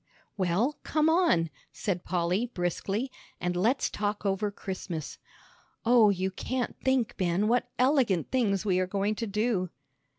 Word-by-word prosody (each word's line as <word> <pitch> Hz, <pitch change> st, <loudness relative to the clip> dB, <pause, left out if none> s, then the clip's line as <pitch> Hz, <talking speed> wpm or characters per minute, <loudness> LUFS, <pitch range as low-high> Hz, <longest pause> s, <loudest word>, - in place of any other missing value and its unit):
"Well, 200 Hz, -, 0 dB
come 310 Hz, +1 st, +2 dB
on," 250 Hz, -, +3 dB, 0.2 s
said 180 Hz, -4 st, -2 dB
Polly, 180 Hz, +6 st, 0 dB
briskly, 200 Hz, +5 st, -2 dB, 0.3 s
"and 180 Hz, -1 st, -1 dB
let's 230 Hz, +9 st, +2 dB
talk 205 Hz, 0 st, -3 dB
over 200 Hz, +1 st, +1 dB
Christmas. 185 Hz, -5 st, -6 dB, 0.7 s
Oh, 230 Hz, -2 st, +6 dB
you 190 Hz, -1 st, 0 dB
can't 250 Hz, +6 st, -3 dB
think, 260 Hz, -3 st, +1 dB
Ben, 185 Hz, +2 st, +1 dB
what 245 Hz, +2 st, +2 dB
elegant 250 Hz, -, +2 dB
things 215 Hz, -7 st, +1 dB
we 185 Hz, -3 st, +2 dB
are 185 Hz, -, 0 dB
going 200 Hz, +2 st, 0 dB
to 230 Hz, +1 st, -4 dB
do!" 210 Hz, -3 st, 0 dB
205 Hz, 140 wpm, -29 LUFS, 185-245 Hz, 0.7 s, Oh